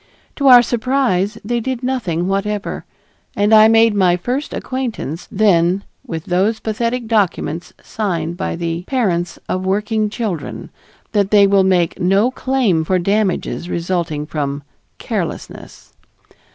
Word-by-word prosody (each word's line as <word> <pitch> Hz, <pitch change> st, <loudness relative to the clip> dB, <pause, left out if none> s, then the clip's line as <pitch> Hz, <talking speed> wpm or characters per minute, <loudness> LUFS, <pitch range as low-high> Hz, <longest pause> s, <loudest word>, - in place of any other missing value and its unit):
To 280 Hz, -, +1 dB
our 245 Hz, -2 st, +9 dB
surprise 235 Hz, -5 st, 0 dB
they 240 Hz, +2 st, 0 dB
did 255 Hz, +1 st, -4 dB
nothing 190 Hz, -10 st, -1 dB
whatever, 200 Hz, +1 st, -2 dB, 0.5 s
and 205 Hz, +2 st, +2 dB
I 215 Hz, 0 st, +8 dB
made 225 Hz, 0 st, +5 dB
my 185 Hz, -3 st, +3 dB
first 255 Hz, -, -3 dB
acquaintance 240 Hz, -, -4 dB
then 190 Hz, -2 st, +2 dB, 0.2 s
with 165 Hz, -2 st, -6 dB
those 195 Hz, +5 st, +1 dB
pathetic 230 Hz, +2 st, -2 dB
documents 195 Hz, -6 st, -1 dB
signed 175 Hz, -6 st, -3 dB
by -, -, -3 dB
the 170 Hz, 0 st, -3 dB
parents 185 Hz, -10 st, -1 dB
of 185 Hz, -, -2 dB
working 210 Hz, +3 st, 0 dB
children, 205 Hz, -9 st, -5 dB, 0.4 s
that 200 Hz, -2 st, +1 dB
they 205 Hz, -1 st, +6 dB
will 195 Hz, -1 st, +4 dB
make 180 Hz, -3 st, +1 dB
no 195 Hz, +7 st, +2 dB
claim 255 Hz, -12 st, +1 dB
for 185 Hz, +3 st, +1 dB
damages 195 Hz, -1 st, -1 dB
resulting 170 Hz, -4 st, -2 dB
from 145 Hz, -2 st, -3 dB, 0.3 s
"carelessness." -, -, -6 dB
200 Hz, 130 wpm, -18 LUFS, 175-225 Hz, 0.5 s, our